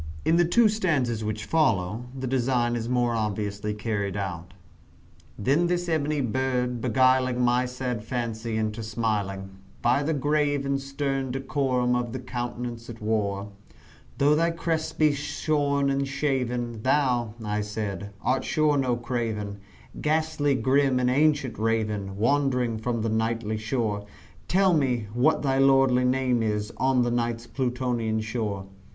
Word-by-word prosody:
In 160 - +4
the 175 - +4
two 225 +7 +5
stanzas 145 - 0
which 110 0 -3
follow, 115 - +1
the 130 - -3
design 120 -2 +1
is 115 0 -3
more 120 -1 +1
obviously 105 -1 -2
carried 105 -3 -2
out: 90 -2 -5 0.8
Then 140 +11 +2
this 175 0 -1
ebony 150 -2 0
bird, 125 0 -1
beguiling 130 +1 +3
my 125 +1 +2
sad 125 -3 -4
fancy 115 -1 -3
into 110 0 -2
smiling 105 -3 -2 0.3
By 125 +4 +3
the 155 +2 0
grave 145 0 +1
and 140 0 0
stern 135 -1 -2
decorum 130 -2 0
of 120 -1 -2
the 130 - -3
countenance 120 -1 -5
it 115 -1 -8
wore, 105 -2 -1 0.7
"Though 145 +2 +4
thy 165 +2 +3
crest 165 -1 -2
be 155 -2 +4
shorn 145 -1 0
and 135 0 0
shaven, 125 -5 -1
thou," 125 -4 +1
I 105 0 -1
said, 105 -2 -4
"art 130 +1 +1
sure 150 -2 +2
no 125 -2 +1
craven, 115 -4 -3 0.4
Ghastly 155 -2 +1
grim 130 +2 +2
and 125 0 +2
ancient 145 -4 +2
Raven 105 -3 -1
wandering 125 -1 +1
from 115 0 -2
the 115 - 0
Nightly 110 0 -1
shore 110 -2 -2 0.4
Tell 190 0 +3
me 125 -8 +1
what 135 +7 +2
thy 135 -1 +1
lordly 135 -2 +4
name 125 -2 +2
is 105 0 -1
on 130 -1 +3
the 120 - 0
Night's 120 -1 -1
Plutonian 120 -3 -1
shore?" 110 -3 -3
125 Hz, 145 wpm, -26 LUFS, 110-135 Hz, 0.8 s, two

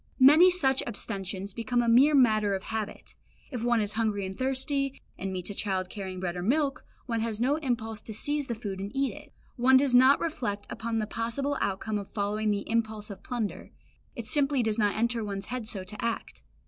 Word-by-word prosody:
Many 300 +8 +8
such 270 -8 +2
abstentions 195 -3 -4
become 240 +2 0
a - - -1
mere 265 +6 +6
matter 215 -6 +4
of 190 - -5
habit. 220 -1 -5 0.4
If 245 -4 -4
one 240 -1 +3
is 205 0 +1
hungry 215 -3 0
and 190 0 -6
thirsty, 265 +2 0 0.2
and 195 +1 -4
meets 185 +1 -4
a - - -5
child 190 -2 -2
carrying 190 -3 -5
bread 180 -1 -3
or 175 - -3
milk, 275 - +1 0.2
one 230 -2 -1
has 220 -1 -2
no 270 +5 +2
impulse 230 -7 -2
to 220 - -8
seize 290 +5 -1
the 235 - -2
food 205 -4 -5
and 200 +1 -5
eat 275 0 +1
it. - - -13 0.3
One 260 +2 +6
does 270 -1 +3
not 260 +3 +7
reflect 220 -11 -3
upon 230 0 -3
the 215 - 0
possible 235 +6 -2
outcome 205 +2 -1
of 200 - -8
following 210 +1 -1
the 205 -1 -1
impulse 220 -2 -1
of 195 - -9
plunder; 235 -5 -4 0.5
it 235 -4 -6
simply 275 0 +2
does 220 0 0
not 205 -1 +2
enter 235 0 +1
one's 200 -1 -4
head 245 -4 -4
so 195 -4 -1
to 210 +5 -8
act. 230 -1 -3
225 Hz, 210 wpm, -28 LUFS, 205-260 Hz, 0.5 s, Many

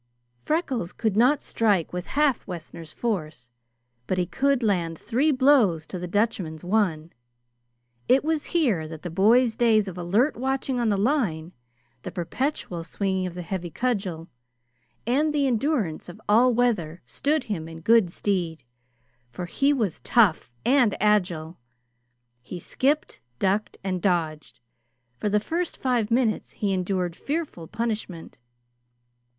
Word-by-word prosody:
Freckles 270 - -1
could 220 -4 -1
not 255 +6 +4
strike 205 -8 +1
with 180 0 -4
half 295 -5 +2
Wessner's 165 -3 -8
force, 155 - -4 0.6
but 185 - 0
he 180 - +1
could 265 +8 +1
land 175 -6 0
three 265 - +1
blows 255 - +4
to 185 - -6
the 180 - -4
Dutchman's 180 -5 -1
one. 175 -5 0 0.9
It 265 +2 +4
was 315 -1 -1
here 235 - +1
that 160 -1 -9
the 175 - -5
boy's 225 +6 +4
days 220 -4 +3
of 180 -1 -6
alert 210 - +2
watching 265 0 -1
on 235 -2 +1
the 205 - +2
line, 195 - 0 0.5
the - - -6
perpetual 180 - -3
swinging 190 +1 -2
of 175 - -8
the 180 - -5
heavy 175 0 -4
cudgel, 190 -5 -2 0.8
and 285 +7 +2
the 285 -1 +2
endurance 235 - 0
of 175 - -11
all 235 +5 +5
weather 210 -9 0
stood 300 0 0
him 170 -7 -4
in 165 0 -10
good 225 0 +4
stead; 175 -3 -2 0.7
for 150 +9 -6
he 275 +11 +1
was 220 - -1
tough, 215 - +3 0.2
and 250 -6 +3
agile. 180 -6 +1 0.8
He 175 - -8
skipped, 285 - -1 0.2
ducked, 195 - 0
and 185 -2 -2
dodged. 160 -5 -1 0.6
For 210 - 0
the 210 +1 +3
first 335 +10 -3
five 245 -5 0
minutes 230 -2 0
he 200 -2 -1
endured 180 -2 -1
fearful 285 - -4
punishment. 215 -7 -4
205 Hz, 140 wpm, -25 LUFS, 175-250 Hz, 0.9 s, all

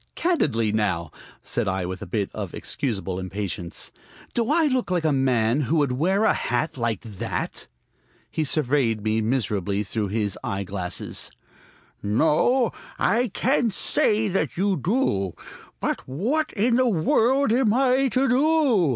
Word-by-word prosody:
"Candidly, 135 - +1
now," 95 -7 -1 0.3
said - - -1
I 95 -1 -1
with 95 +1 -5
a - - -6
bit 100 +1 -2
of - - -5
excusable 95 -8 -3
impatience, 95 -2 -4 0.4
"do 235 0 0
I 325 +2 +4
look 255 -7 0
like 180 -2 0
a 155 - +3
man 130 -1 +2
who 145 +4 0
would 145 -4 +2
wear 185 +11 +1
a - - +4
hat 125 +6 -1
like 115 -5 -1
that?" 105 -5 -4 0.6
He 160 - 0
surveyed 135 -7 +1
me 110 +1 +1
miserably 105 -4 0
through 105 +1 -2
his 105 -1 -2
eye 100 0 -2
glasses. 90 -2 -3 0.7
"No, 160 - +2 0.3
I 235 +5 +2
can't 235 0 0
say 215 +1 +2
that 190 -1 -1
you 195 +1 +2
do. 155 - 0 0.4
But - - -2
what 230 - -1
in 230 +3 +2
the 255 -1 +3
world 230 - +2
am 245 -3 +3
I 260 +2 +3
to 260 +2 +1
do?" 260 - +3
145 Hz, 150 wpm, -24 LUFS, -, 0.7 s, I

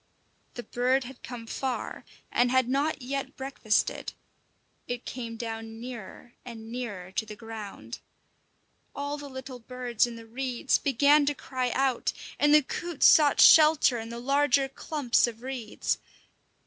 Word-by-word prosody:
The 240 - -6
bird 255 +3 +1
had 250 +1 -11
come 240 -2 -8
far 255 +2 -4 0.3
and 245 0 +3
had 260 -1 +3
not 280 +2 0
yet 275 +2 -4
breakfasted; 265 -5 -1 0.7
it 245 0 -5
came 230 -2 -6
down 225 -1 -6
nearer 240 -1 -9
and 225 -2 -9
nearer 205 -7 -5
to 195 - -1
the 215 -1 -9
ground. 220 -2 -8 1.0
All 285 +1 -3
the 285 -1 -8
little 260 -1 -8
birds 245 -1 -1
in 235 - -8
the 230 0 -11
reeds 250 +2 -1
began 285 +2 +4
to 290 - +1
cry 255 -2 -3
out, 265 -2 +1 0.3
and 295 - +4
the 300 0 +7
coots 340 +2 -2
sought 295 -3 +6
shelter 305 -6 +7
in 225 0 -7
the 235 - -6
larger 275 +1 +2
clumps 270 -3 +1
of 230 0 -8
reeds. 255 -5 -3
250 Hz, 150 wpm, -28 LUFS, 230-275 Hz, 1.0 s, the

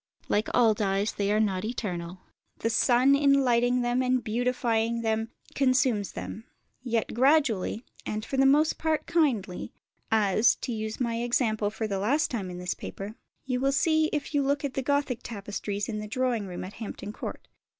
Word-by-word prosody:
Like 210 +2 +1
all 230 -3 +5
dyes, 200 0 0
they 200 0 -1
are 210 - +3
not 195 -3 0
eternal; 185 -6 -4 0.4
the 230 - -1
sun 250 +4 +4
in 280 0 +4
lighting 245 0 +2
them 240 +1 +1
and 255 -1 +1
beautifying 230 0 0
them 225 0 -1 0.2
consumes 255 -6 +2
them; 225 - -7 0.4
yet 235 -3 -1
gradually, 250 -5 +2 0.2
and 215 +1 -4
for - - -4
the 270 0 +5
most 300 +3 +3
part 315 -1 0
kindly, 255 - 0 0.4
as 215 +1 +4
(to 245 - -4
use 220 0 -4
my 235 -2 -1
example 225 -3 +1
for 220 +1 -4
the 200 -2 -2
last 265 +10 +1
time 205 -7 -3
in 180 - -7
this 180 0 -2
paper) 200 +2 -7 0.3
you 255 -2 -1
will 270 +1 +2
see 315 +3 +3
if 300 0 -3
you 290 - +3
look 280 +1 0
at 275 - -3
the 270 - -1
Gothic 280 -3 0
tapestries 205 -1 -4
in 215 -2 -3
the 210 - -5
drawing 235 -2 -1
room 180 -1 -6
at 185 +2 -8
Hampton 210 -1 -7
Court. - - -7
230 Hz, 180 wpm, -27 LUFS, 210-260 Hz, 0.4 s, all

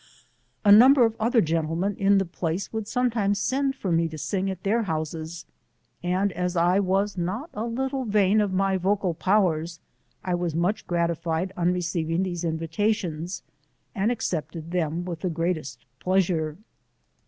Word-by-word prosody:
A 205 - +7
number 250 +4 +8
of 225 -1 -1
other 230 +1 +3
gentlemen 165 +4 -1
in 200 0 +3
the 195 - +2
place 175 +3 -3
would 220 -2 -3
sometimes 225 -5 +1
send 270 +5 0
for 195 -9 -3
me 165 0 +2
to 160 -1 -8
sing 195 +5 -2
at 185 -2 -6
their 220 +4 +2
houses, 160 -2 -4 0.6
and 185 +3 0
as 180 0 -2
I 175 +3 +3
was 195 0 0
not 210 - -3
a 215 +2 -3
little 265 +2 -2
vain 205 -1 +3
of 205 -2 0
my 190 0 +1
vocal 190 -1 0
powers, 170 -3 +1 0.4
I 180 - -1
was 175 -2 -1
much 175 +6 0
gratified 170 +1 -1
on 175 0 +1
receiving 170 -1 -1
these 175 -2 -3
invitations, 165 +1 -2 0.5
and 210 +2 +1
accepted 165 -6 -3
them 170 -1 -1
with 170 -3 -5
the 185 - -2
greatest 160 -6 -3
pleasure. 175 -5 0
180 Hz, 155 wpm, -25 LUFS, 165-205 Hz, 0.6 s, number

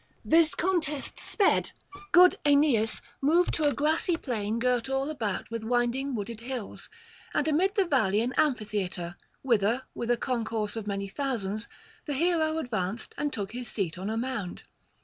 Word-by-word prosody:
This 325 0 +4
contest 320 -6 -1
sped, 400 -3 +1 0.4
good 360 +1 +7
Aeneas 280 -7 +3 0.2
moved 335 +6 +3
to 310 - +1
a - - +3
grassy 315 +4 +1
plain 225 -7 -2
girt 250 +1 +1
all 270 +2 0
about 225 -8 -3
with 230 -1 -4
winding 245 +3 0
wooded 220 +1 -5
hills, 245 -2 -6 0.5
and 295 - +2
amid 365 +7 +2
the 395 - +3
valley 220 - +2
an 245 +3 -1
amphitheatre, 205 - -1 0.3
whither, 235 0 +2
with 235 - -4
a 240 - +3
concourse 225 -4 -2
of 220 -2 -5
many 200 -1 -2
thousands, 215 -3 -3 0.4
the 290 - -1
hero 320 0 +2
advanced 225 - -3
and 290 0 -1
took 205 -7 -4
his 245 +1 -5
seat 180 -5 -2
on 195 +3 -3
a 220 - -2
mound. 230 -7 -3
245 Hz, 160 wpm, -28 LUFS, 215-295 Hz, 0.5 s, good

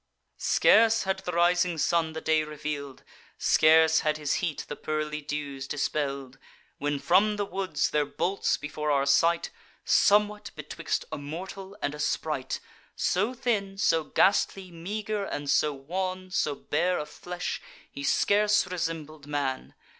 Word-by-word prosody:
"Scarce 225 +1 +4
had 190 0 -1
the 185 -2 -4
rising 175 0 +2
sun 160 +1 +1
the 160 - -5
day 155 -1 +2
reveal'd, 150 -2 -6 0.3
Scarce 160 0 +5
had 155 0 0
his 150 -2 -1
heat 165 -6 -3
the 145 - -5
pearly 155 0 -3
dews 145 -2 -5
dispell'd, 140 -2 -2 0.4
When 145 0 -1
from 195 +8 +3
the 205 -1 -1
woods 195 -1 -1
there 150 -1 +2
bolts, 175 +7 0
before 150 0 -4
our 140 -1 +2
sight, 165 +5 +3 0.3
Somewhat 210 0 +3
betwixt 155 +1 -3
a 155 - -4
mortal 190 +7 -7
and 145 - 0
a 150 - -8
sprite, 150 -2 -2 0.4
So 205 +8 0
thin, 205 -6 -1
so 165 -6 +2
ghastly 190 +2 +2
meager, 205 +5 -3
and 145 -7 -4
so 145 +2 +3
wan, 185 +6 -4
So 150 -6 0
bare 175 +6 0
of 150 - -4
flesh, 180 0 -5 0.3
he 140 - -7
scarce 210 +7 +3
resembled 160 -4 -5
man. 140 -3 -3
160 Hz, 145 wpm, -27 LUFS, 150-190 Hz, 0.4 s, Scarce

